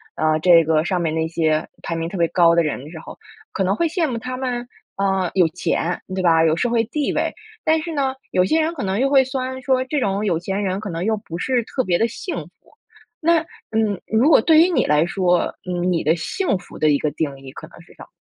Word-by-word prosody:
呃， 155 0 +1
这 170 0 +6
个 155 0 +2
上 180 0 -1
面 160 -2 -1
那 160 0 0
些 160 -1 0 0.2
排 170 - -3
名 165 0 -3
特 195 - -6
别 170 -1 +2
高 170 -1 +4
的 170 - +4
人 150 -4 -3
的 150 - -10
时 160 - -9
候， - - -11 0.3
可 195 - -1
能 190 +2 +1
会 335 +8 +1
羡 325 0 0
慕 240 -3 -3
他 255 +2 -5
们， 245 -2 -3 0.3
呃， 190 -2 0
有 180 -3 +4
钱 175 0 -2 0.2
对 190 - -1
吧， 165 -1 +4
有 160 0 +3
社 240 +8 0
会 230 -1 +2
地 285 +5 -2
位。 - - -1 0.3
但 315 0 +3
是 335 - -5
呢， 270 -2 0 0.2
有 180 0 +3
些 320 +9 +2
人 325 +2 -1
可 275 - -4
能 195 +3 -1
又 275 +1 +2
会 270 -2 +5
酸 260 0 -4
说， 260 -1 +2
这 285 +2 -1
种 200 -2 -1
有 175 -5 +1
钱 195 +3 -3
人 190 0 -1
可 210 -2 -6
能 165 +1 -3
又 220 +1 0
不 170 -4 -8
是 250 +1 0
特 255 +3 -2
别 175 -4 +1
地 230 - +2
幸 345 - -6
福。 - - -19 0.7
那 335 +1 +3 0.3
嗯， 215 -4 0
如 230 +8 +3
果 - - +7
对 315 +5 +5
于 350 - +4
你 355 - +1
来 150 +1 +3
说， 180 -1 +1
嗯， 180 0 -1
你 170 - 0
的 160 +3 +3
幸 200 - -1
福 - - -13
的 155 - +2
一 145 - +4
个 150 - 0
定 145 -2 -3
义 135 -1 -11
可 - - -10
能 - - -16
是 - - -19
什 - - -12
么？ - - -15
190 Hz, 280 characters per minute, -21 LUFS, 165-255 Hz, 0.7 s, 果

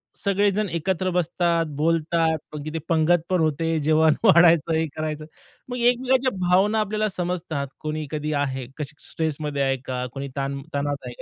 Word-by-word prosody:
सगळेजण 200 +1 +1
एकत्र 185 +2 -1
बसतात, 170 -1 +1
बोलतात. 160 0 +1 0.2
अगदी 155 +2 -4
पंगतपण 170 +2 +2
होते, 160 +1 0
जेवण 155 0 +4
वाढायचं 170 -5 +5
हे 160 0 +1
करायचं. 155 -1 -4 0.4
मग 250 - -3
एकमेकांच्या 250 +2 +2 0.2
भावना 205 +4 +4
आपल्याला 215 +1 0
समजतात. 170 -6 -2
कोणी 155 0 -3
कधी 155 0 -2
आहे, 130 -2 -3
कशी 150 -1 -5
स्ट्रेसमध्ये 150 -3 -2
आहे 135 0 +1
का, 125 -1 -3
कोणी 140 0 -5
ताण-तणावात 140 0 -3
आहे 120 - -6
160 Hz, 140 wpm, -24 LUFS, 150-180 Hz, 0.4 s, वाढायचं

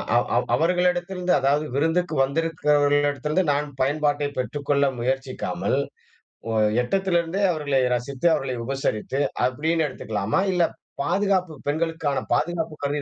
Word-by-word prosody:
அவ் - - +3
அவ் - - +1
அவர்களிடத்திலிருந்து 180 +2 +1
அதாவது 145 +3 +2
விருந்துக்கு 165 +3 +1
வந்திருக்கிறவர்களிடத்திலிருந்து 145 +1 +1
நான் 145 +1 -1
பயன்பாட்டை 145 +1 +1
பெற்றுக்கொள்ள 140 +2 0
முயற்சிக்காமல், 130 +2 -1 0.7
ஒ - - -1 0.3
எட்டத்திலிருந்தே 185 +3 0
அவர்களை 145 -4 0
ரசித்து, 130 +5 -1
அவர்களை 130 -4 -1
உபசரித்து 135 0 -2 0.3
அப்படின்னு 160 +5 0
எடுத்துக்கலாமா? 110 - -2
இல்ல 180 - +3 0.4
பாதுகாப்பு 185 -2 +1 0.2
பெண்களுக்கான 160 -2 -1
பாதுகாப்பு 165 -1 -1
கருதி 145 +1 -1
150 Hz, 105 wpm, -24 LUFS, 140-170 Hz, 0.7 s, அவ்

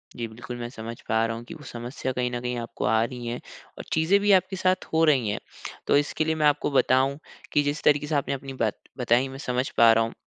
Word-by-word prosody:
जी, 120 -1 -3
बिल्कुल, 120 +2 -8
मैं 120 0 -4
समझ 115 -2 -8
पा 110 +1 +3
रहा 115 0 -2
हूँ 115 - -7
कि - - -8
वो 150 - -11
समस्या 120 +2 -5
कहीं 125 -1 -1
न 120 - -2
कहीं 125 0 -2
आपको 115 - -5
आ 110 0 +3
रही 120 0 -5
है 120 - -2 0.4
और - - -6
चीज़ें 160 +6 +3
भी 205 0 +3
आपके 190 0 +3
साथ 185 0 +1
हो 160 0 +4
रही 130 -8 +3
हैं। 105 - -2 0.5
तो - - +5
इसके 145 +2 0
लिए 160 0 +1
मैं 155 -1 +1
आपको 145 0 +1
बताऊँ 135 0 +3 0.4
कि 145 - +4
जिस 145 +1 -2
तरीके 150 0 +3
से 155 - -1
आपने 140 - 0
अपनी 135 0 -6
बात 110 -5 -1 0.2
बताई, 125 +1 +2
मैं 135 0 -8
समझ 125 -1 -2
पा 115 0 +8
रहा 115 0 +3
हूँ 115 - -4
130 Hz, 255 wpm, -26 LUFS, 120-150 Hz, 0.5 s, पा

